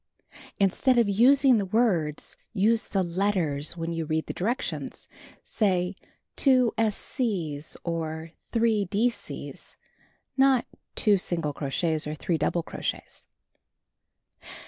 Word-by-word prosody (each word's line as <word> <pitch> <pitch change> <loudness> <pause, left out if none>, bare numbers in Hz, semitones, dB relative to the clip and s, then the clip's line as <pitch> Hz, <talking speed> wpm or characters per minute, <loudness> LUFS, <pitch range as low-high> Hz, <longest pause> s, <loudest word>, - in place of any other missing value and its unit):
Instead 205 +6 +3
of 235 -3 +4
using 255 +4 +5
the 200 - -1
words, 180 -9 0 0.2
use 220 +2 +2
the 195 -2 0
letters 170 -5 0
when 165 0 -3
you 165 0 -2
read 160 0 -1
the - - -5
directions. 235 +8 -3 0.4
Say 185 -3 0 0.4
"2 255 -4 +4
s 220 -2 +1
c's" 170 - -2
or 160 -1 -4 0.2
"3 225 -3 +2
d 215 +6 +1
c's"; - - -8 0.6
not 265 -2 +4 0.3
2 205 -3 +4
single 165 -5 -2
crochets, 155 +3 -1
or 150 - -3
3 170 +2 -1
double 170 - 0
crochets. - - -5
195 Hz, 120 wpm, -26 LUFS, 165-230 Hz, 0.6 s, using